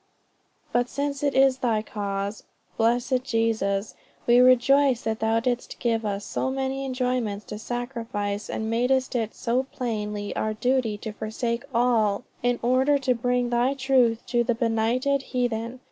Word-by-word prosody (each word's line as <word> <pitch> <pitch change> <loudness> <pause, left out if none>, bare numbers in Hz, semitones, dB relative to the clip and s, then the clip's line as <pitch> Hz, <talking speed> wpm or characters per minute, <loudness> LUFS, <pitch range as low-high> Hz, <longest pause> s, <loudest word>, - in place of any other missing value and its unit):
_ - - -32
But 245 0 +2
since 280 -1 -2
it 285 -2 0
is 265 -1 +4
thy 225 -4 +1
cause, 200 -1 -4 0.3
blessed 245 +3 +1
Jesus, 220 -4 0 0.3
we 240 +1 +5
rejoice 255 +1 +5
that 220 -1 -2
thou 225 +1 +2
didst 245 +1 -2
give 225 -2 0
us 200 0 -3
so 260 - -2
many 270 0 -2
enjoyments 250 -5 -1
to 210 - -7
sacrifice, 230 -4 -4
and 220 - -3
madest 250 +3 +1
it 225 -2 -1
so 240 +2 0
plainly 210 -4 -3
our 215 0 -1
duty 245 -2 0
to 220 - -6
forsake 230 +3 -3
all 230 -3 +2 0.2
in 245 0 +1
order 260 +4 +3
to 265 -2 +1
bring 245 0 0
thy 245 +3 +2
truth 255 -4 +2
to 240 -1 +1
the 235 0 0
benighted 235 +4 +1
heathen. 245 -2 -2
240 Hz, 155 wpm, -25 LUFS, 220-255 Hz, 0.3 s, we